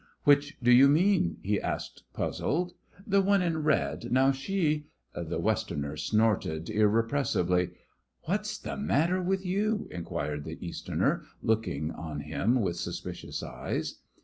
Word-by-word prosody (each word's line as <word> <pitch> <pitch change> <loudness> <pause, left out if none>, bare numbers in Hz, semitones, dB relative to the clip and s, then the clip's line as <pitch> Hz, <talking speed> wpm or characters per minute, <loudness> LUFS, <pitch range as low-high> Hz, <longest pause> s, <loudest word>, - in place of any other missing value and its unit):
"Which 145 0 +4
do 120 - +5
you 130 +3 +8
mean?" 160 - +3
he 105 +1 0
asked, - - -4
puzzled. 175 +4 -1 0.3
"The 200 -1 +3
one 195 -1 +3
in 165 -3 0
red. 150 -5 0
Now, 130 +2 +5
she 150 0 -1 0.2
" - - -37
The - - -3
Westerner 70 +1 -1
snorted 90 -1 +1
irrepressibly. 105 -4 +2 0.5
"What's 210 +5 -1
the - - -6
matter 180 -2 +1
with 190 +1 -1
you?" 205 +3 0
inquired 85 -4 -3
the - - -7
Easterner, - - -1 0.2
looking 85 -9 0
on 80 -3 -6
him 100 - +1
with 90 -4 -1
suspicious - - -5
eyes. - - -4
130 Hz, 135 wpm, -29 LUFS, -, 0.5 s, you